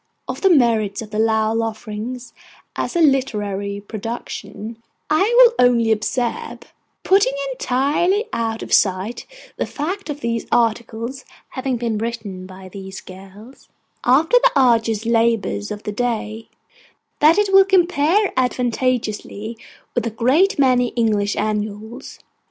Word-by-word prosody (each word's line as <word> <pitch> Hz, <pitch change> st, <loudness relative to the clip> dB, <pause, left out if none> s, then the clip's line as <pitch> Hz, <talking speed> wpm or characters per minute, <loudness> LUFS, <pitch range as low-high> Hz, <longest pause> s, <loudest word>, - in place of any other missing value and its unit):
Of -, -, -5 dB
the 385 Hz, -, +4 dB
merits 230 Hz, -, +2 dB
of 215 Hz, -, -12 dB
the 210 Hz, -, -2 dB
Lowell 220 Hz, 0 st, +2 dB
Offering 225 Hz, +2 st, -5 dB, 0.6 s
as -, -, -3 dB
a 340 Hz, -, +2 dB
literary 205 Hz, -8 st, 0 dB
production, 220 Hz, +1 st, -7 dB, 0.3 s
I 310 Hz, -, +3 dB, 0.2 s
will -, -, +8 dB
only 235 Hz, -2 st, +2 dB
observe, 235 Hz, +3 st, -2 dB, 0.4 s
putting 405 Hz, +6 st, +3 dB, 0.2 s
entirely 350 Hz, -, +1 dB
out 225 Hz, -1 st, -2 dB
of -, -, -5 dB
sight 195 Hz, +4 st, +1 dB, 0.3 s
the -, -, -2 dB
fact 360 Hz, +6 st, -4 dB
of 295 Hz, 0 st, -5 dB
the 230 Hz, -1 st, -2 dB
articles 235 Hz, +2 st, -1 dB, 0.3 s
having 260 Hz, -1 st, -3 dB
been 230 Hz, -2 st, -2 dB
written 215 Hz, -5 st, -5 dB
by 190 Hz, 0 st, -11 dB
these 190 Hz, 0 st, -9 dB
girls 195 Hz, +7 st, -14 dB, 0.3 s
after 310 Hz, -, +4 dB
the -, -, +4 dB
arduous 230 Hz, -4 st, +2 dB
labours 230 Hz, -3 st, +1 dB
of 210 Hz, 0 st, -6 dB
the 210 Hz, -, -3 dB
day, 225 Hz, -1 st, -3 dB, 0.7 s
that 315 Hz, +4 st, +5 dB
it 410 Hz, -2 st, +1 dB
will 390 Hz, 0 st, +8 dB
compare 365 Hz, +1 st, +2 dB
advantageously 245 Hz, -3 st, -1 dB, 0.4 s
with 240 Hz, -2 st, -1 dB
a -, -, 0 dB
great 260 Hz, -, +2 dB
many 255 Hz, -3 st, +3 dB
English 210 Hz, -3 st, +1 dB
Annuals. 215 Hz, +3 st, -4 dB
230 Hz, 130 wpm, -20 LUFS, 215-270 Hz, 0.7 s, will